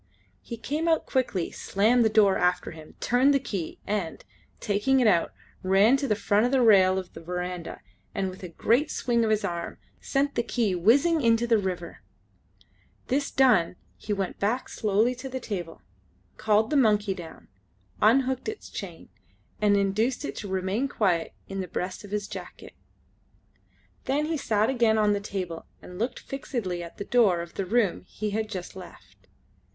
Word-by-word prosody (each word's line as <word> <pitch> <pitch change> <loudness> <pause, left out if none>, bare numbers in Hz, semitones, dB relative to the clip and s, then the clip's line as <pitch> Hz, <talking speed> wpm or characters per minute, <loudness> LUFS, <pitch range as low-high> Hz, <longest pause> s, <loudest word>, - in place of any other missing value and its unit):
He 235 - -7
came 300 +8 -2
out 325 -1 +2
quickly, 225 - -1
slammed 225 +5 +2
the 220 - +3
door 210 -3 +4
after 180 0 0
him, 155 -1 -13
turned 260 +4 +3
the - - +3
key, 195 -10 -5
and, 200 -6 -3 0.3
taking 215 +7 +1
it 250 - +3
out, 180 -6 +3 0.3
ran 195 +6 +4
to 275 0 -2
the 210 - +2
front 215 +5 +2
rail 195 -7 +5
of 185 -1 -5
the - - -10
verandah, 180 0 -5 0.3
and, 190 -1 -1
with 185 - -12
a 180 - -7
great 240 - +1
swing 235 -2 0
of 220 - +1
his 215 -1 +1
arm, 170 -1 -4 0.2
sent 280 0 0
the - - +1
key 230 -4 0
whizzing 275 - +3
into 230 -1 +3
the 230 -2 +3
river. 180 -3 -5 1.1
This 280 +2 0
done 220 -11 +3 0.2
he 210 - -7
went 195 -2 -2
back 225 +6 -1
slowly 215 +3 +1
to 255 +2 -8
the 260 0 -4
table, 180 -9 -6 0.5
called 215 +1 +2
the - - +1
monkey 210 -5 +3
down, 175 -4 -11 0.5
unhooked 260 - +3
its 435 - -8
chain, - - -8 0.5
and 205 -1 +4
induced 215 +8 0
it - - -5
to 205 - -5
remain 190 +7 -1
quiet 185 -10 0 0.2
in 195 - -5
the 185 - -5
breast 185 +3 -4
of 205 - -10
his 205 0 -3
jacket. - - -9 1.3
Then 290 +3 0
he 325 +1 -1
sat 215 -5 +1
again 235 -4 +2
on 210 -1 +3
the 205 - 0
table 185 -5 -5
and 180 +1 -11
looked 235 +4 -2
fixedly 230 -10 -4
at 170 0 -9
the 200 - -5
door 205 -9 +3
of 170 0 -9
the 195 - -3
room 215 -3 +1
he 210 0 -4
had 215 +1 -2
just 185 -4 -6
left. 185 -2 -14
210 Hz, 175 wpm, -26 LUFS, 185-245 Hz, 1.3 s, rail